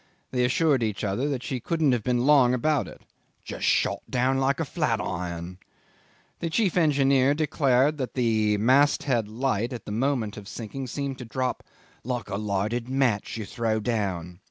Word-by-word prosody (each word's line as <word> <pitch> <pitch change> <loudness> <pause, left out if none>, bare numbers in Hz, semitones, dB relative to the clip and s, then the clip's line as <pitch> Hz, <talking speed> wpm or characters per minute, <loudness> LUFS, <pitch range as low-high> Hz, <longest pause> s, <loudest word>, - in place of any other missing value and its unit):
They 125 -1 +1
assured 140 +1 +2
each 110 -2 -2
other 110 +8 -1
that 135 -3 -3
she 130 -4 -3
couldn't 160 +2 +1
have 120 -3 +1
been 125 +1 +1
long 135 -4 +5
about 150 +3 +1
it - - -13 0.4
"Just - - -5
shot - - +2
down 130 +2 +1
like 135 +2 +1
a 165 - 0
flat 140 - -1
iron." 90 0 -5 0.8
The 170 - -2
chief 195 +1 +1
engineer 140 -4 +3
declared 145 -1 +2
that 130 - -4
the 110 -4 +2
mast 135 +7 +3
head 120 -6 0
light 115 0 -1
at 120 - -7
the - - -6
moment 115 -2 -1
of 100 -1 -9
sinking 115 +4 -6
seemed 135 +1 -4
to 125 - -7
drop 130 +2 -2 0.4
"like 120 -4 -3
a 100 - -1
lighted 105 +4 -2
match 130 -6 0
you 110 - -4
throw 110 0 -1
down." 95 -7 -2
125 Hz, 180 wpm, -26 LUFS, 110-140 Hz, 0.8 s, long